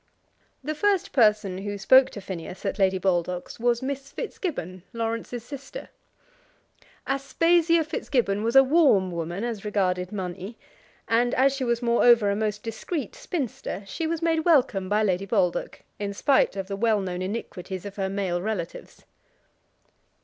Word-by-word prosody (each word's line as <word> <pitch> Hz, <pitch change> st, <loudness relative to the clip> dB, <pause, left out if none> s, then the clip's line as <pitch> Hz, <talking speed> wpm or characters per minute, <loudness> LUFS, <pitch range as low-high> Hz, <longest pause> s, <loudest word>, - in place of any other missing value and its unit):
The 305 Hz, +3 st, -2 dB
first 395 Hz, +4 st, +1 dB
person 210 Hz, -6 st, +3 dB
who 205 Hz, +1 st, -4 dB
spoke 260 Hz, +6 st, +6 dB
to 205 Hz, -, -8 dB
Phineas 185 Hz, 0 st, -7 dB
at 195 Hz, -, -2 dB
Lady 190 Hz, -1 st, +3 dB
Baldock's 180 Hz, 0 st, -1 dB
was 240 Hz, +1 st, +1 dB
Miss 275 Hz, 0 st, -4 dB
Fitzgibbon, 230 Hz, -, -5 dB
Laurence's 230 Hz, +1 st, -3 dB
sister. 280 Hz, -, -9 dB, 1.2 s
Aspasia 330 Hz, +4 st, +2 dB
Fitzgibbon 240 Hz, -9 st, -1 dB
was 230 Hz, +2 st, -1 dB
a 270 Hz, -, +9 dB
warm 265 Hz, -, +4 dB
woman 170 Hz, +4 st, -4 dB
as 230 Hz, -4 st, -4 dB
regarded 185 Hz, -3 st, 0 dB
money, 190 Hz, +2 st, -5 dB, 0.5 s
and 240 Hz, +2 st, +2 dB
as 270 Hz, +1 st, +4 dB
she 270 Hz, -, -3 dB
was 235 Hz, 0 st, 0 dB
moreover 235 Hz, -3 st, +5 dB
a -, -, 0 dB
most 210 Hz, -1 st, -2 dB
discreet 235 Hz, -, -4 dB
spinster, 255 Hz, -, -4 dB
she 315 Hz, -, -3 dB
was 330 Hz, 0 st, -2 dB
made 325 Hz, -1 st, +2 dB
welcome 265 Hz, -, +2 dB
by 210 Hz, +1 st, +2 dB
Lady 195 Hz, -1 st, 0 dB
Baldock, 190 Hz, -5 st, 0 dB, 0.2 s
in 200 Hz, -1 st, -3 dB
spite 270 Hz, 0 st, +3 dB
of 195 Hz, -1 st, -4 dB
the 200 Hz, -, -3 dB
well 220 Hz, +1 st, +2 dB
known 185 Hz, -2 st, -4 dB
iniquities 185 Hz, -2 st, -5 dB
of 200 Hz, 0 st, -8 dB
her 190 Hz, -1 st, -1 dB
male 190 Hz, -3 st, -1 dB
relatives. 190 Hz, -4 st, -5 dB
215 Hz, 150 wpm, -25 LUFS, 190-265 Hz, 1.2 s, a